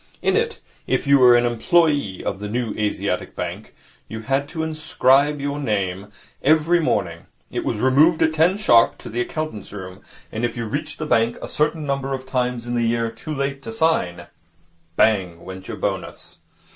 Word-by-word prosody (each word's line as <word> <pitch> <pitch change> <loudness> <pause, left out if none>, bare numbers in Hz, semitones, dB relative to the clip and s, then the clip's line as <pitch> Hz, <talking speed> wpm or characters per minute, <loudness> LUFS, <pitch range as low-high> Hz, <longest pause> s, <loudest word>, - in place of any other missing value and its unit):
In - - +2
it, - - 0 0.3
if - - 0
you 140 0 +5
were 125 -1 +7
an 120 0 +3
employe 130 - +1
of 95 - -2
the 105 0 -5
New 115 -1 -2
Asiatic 105 -1 -2
Bank, - - -6 0.3
you 110 0 -6
had 135 +5 -1
to 160 -2 -3
inscribe 150 -2 +2
your 145 +1 -3
name 100 -6 -2 0.3
every 160 +4 +4
morning. 160 - -1 0.2
It - - -3
was 115 - -2
removed 145 +8 +4
at 160 0 +2
ten 165 +5 +3
sharp 120 - +4
to - - -10
the 120 +2 -2
accountant's 140 -6 -5
room, 95 -1 -9 0.3
and 110 - -4
if 120 0 -1
you 115 - -3
reached 140 +8 -4
the 155 - -4
bank 120 -4 +2
a - - -6
certain 150 +1 -1
number 135 -1 -1
of 130 0 -9
times 125 -2 -2
in 120 - -4
the 120 - +1
year 115 0 0
too 115 +7 -9
late 140 -1 -2
to 225 - -7
sign, 90 - 0 0.7
bang 90 -6 +1
went 95 0 -9
your - - -6
bonus. - - -5
125 Hz, 185 wpm, -22 LUFS, 110-150 Hz, 0.7 s, were